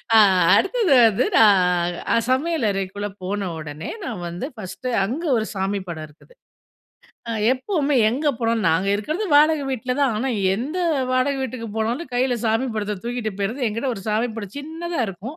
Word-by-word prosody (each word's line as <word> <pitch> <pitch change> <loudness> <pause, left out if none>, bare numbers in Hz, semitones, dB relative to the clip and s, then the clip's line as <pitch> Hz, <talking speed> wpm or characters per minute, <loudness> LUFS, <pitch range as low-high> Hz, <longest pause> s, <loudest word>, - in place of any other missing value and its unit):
ஆ - - +8 0.4
அடுத்தது 390 - +2
வந்து, 220 +4 +1
நான் 180 -5 +4 0.2
அ - - +4
சமையலறைக்குள்ள 210 - -1 0.2
போன 200 0 -2
ஒடனே 150 0 -7 0.2
நான் 220 - -5
வந்து, 175 +7 -5
ஃபர்ஸ்ட் 215 +4 -7 0.2
அங்க 275 - -4
ஒரு 220 - -1
சாமி 195 +1 -1
படம் 155 -2 -5
இருக்குது. 155 - -21 1.0
அ - - -1 0.2
எப்பவுமே 290 +2 -1
எங்க 275 +7 0
போனோம் 230 -1 0
நாங்க 165 +4 +2
இருக்குறது 310 - -2
வாடக 305 0 +4
வீட்ல 255 0 -2
தான். 275 -4 +3
ஆனா, 255 +5 -1 0.3
எந்த 275 - -3 0.3
வாடக 255 +2 +2
வீட்டுக்கு 245 -3 -5
போனாலும் 240 +7 -2
கைல 250 0 +1
சாமி 225 +3 +1
படத்த 210 -1 -2
தூக்கிட்டு 240 -3 -3
போய்றது. 230 +7 -1
என்கிட்ட 230 +6 -3
ஒரு 195 - -8
சாமி 220 +3 +1
படம் 205 -3 -7
சின்னதா 325 +2 -4
இருக்கும். 205 - -8
230 Hz, 160 wpm, -22 LUFS, 200-275 Hz, 1.0 s, ஆ